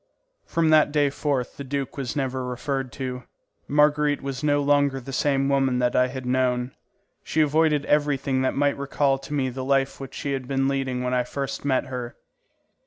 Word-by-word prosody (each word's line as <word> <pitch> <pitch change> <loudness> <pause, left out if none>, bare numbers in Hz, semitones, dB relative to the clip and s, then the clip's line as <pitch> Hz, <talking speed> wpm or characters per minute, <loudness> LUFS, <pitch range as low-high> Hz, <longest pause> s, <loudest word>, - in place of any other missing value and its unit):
From 165 -1 +2
that 155 -1 +5
day 145 -2 +2
forth 140 -3 -2
the 140 - -5
duke 140 0 -3
was 135 -4 -4
never 130 -2 -2
referred 130 +1 -3
to. 125 -1 -5 0.4
Marguerite 150 0 +2
was 135 0 -4
no 145 -1 +3
longer 140 -1 +2
the 135 +2 -9
same 135 0 +1
woman 135 -2 +2
that 125 -1 +1
I 125 0 +4
had 130 0 -7
known. 125 0 +1 0.5
She 160 - +1
avoided 150 -1 +2
everything 140 -3 +1
that 130 - 0
might 145 0 +1
recall 140 -1 +1
to - - -11
me 135 -3 0
the 130 +1 -5
life 135 0 +1
which 135 -1 -8
she 140 - -3
had 130 -2 -4
been 135 0 +1
leading 135 -2 -1
when 125 0 -1
I 125 -1 +2
first 140 +2 -4
met 135 -1 +1
her. 125 -2 -6
135 Hz, 190 wpm, -24 LUFS, 130-145 Hz, 0.5 s, that